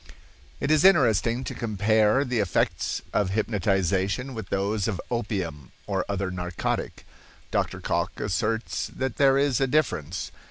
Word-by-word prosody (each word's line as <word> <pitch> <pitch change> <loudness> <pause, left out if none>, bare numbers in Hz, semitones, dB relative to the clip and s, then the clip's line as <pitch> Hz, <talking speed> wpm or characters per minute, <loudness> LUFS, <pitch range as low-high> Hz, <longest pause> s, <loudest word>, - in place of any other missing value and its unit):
It 140 - 0
is 155 +1 +4
interesting 125 - +4
to - - -5
compare 110 +3 +2
the 125 -3 -1
effects 100 -4 0
of 100 -3 +2
hypnotization 100 +3 0
with 110 -5 -7
those 100 +1 0
of 100 -5 -2
opium 95 - -3
or 95 -3 -1
other 100 -2 -1
narcotic. 90 -1 -3 0.5
Dr. - - -1
Cocke - - -2
asserts 110 +2 -1
that 130 -3 -2
there 135 -1 +5
is 140 -2 +2
a 135 - +3
difference. 120 - -1
110 Hz, 135 wpm, -26 LUFS, 95-125 Hz, 0.5 s, there